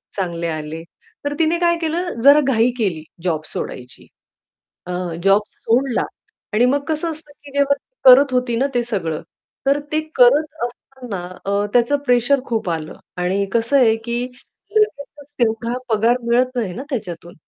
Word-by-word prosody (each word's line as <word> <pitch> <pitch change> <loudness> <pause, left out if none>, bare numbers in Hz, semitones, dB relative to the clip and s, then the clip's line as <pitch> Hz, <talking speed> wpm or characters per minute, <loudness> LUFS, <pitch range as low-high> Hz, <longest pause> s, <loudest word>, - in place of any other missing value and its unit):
चांगले 170 -3 -2
आले. 155 0 -5 0.4
तर 290 - -1
तिने 325 +1 +2
काय 340 -1 +3
केलं 335 +2 -1
जरा 285 +2 +8
घाई 235 -1 +3
केली 180 -9 -1 0.2
जॉब 160 -4 0
सोडायची. 125 -4 -7 0.8
अ, 180 - -4 0.3
जॉब 195 +2 +5
सोडला 245 +2 0 0.5
आणि 225 +3 +3
मग 285 - +1
कसं 320 +2 -1
असतं, 310 -1 -10
की 285 - -11
जेव्हा 280 0 +3
ती 285 - -24
करत 265 +1 +8
होती 250 -2 +1
ना 265 +4 +2
ते 245 - +2
सगळं, 170 -9 -3 0.4
तर 280 +1 +4
ते 310 - +2
करत 265 +5 +6 0.2
असताना 245 -5 -7 0.2
अ, 200 +1 0
त्याचं 245 +4 +3
प्रेशर 245 +3 +3
खूप 225 -6 -2
आलं 160 -2 -4 0.2
आणि 185 +3 0
कसं 235 +4 +2
आहे, 235 -5 +5
की 235 +2 -3 0.5
लगेचच 295 -9 -1
तेवढा 230 +1 0
पगार 230 +2 +3
मिळत 245 +2 +2
नाही 215 -7 -1
ना 255 - -5
त्याच्यातून 175 - -5
240 Hz, 160 wpm, -20 LUFS, 200-280 Hz, 0.8 s, जरा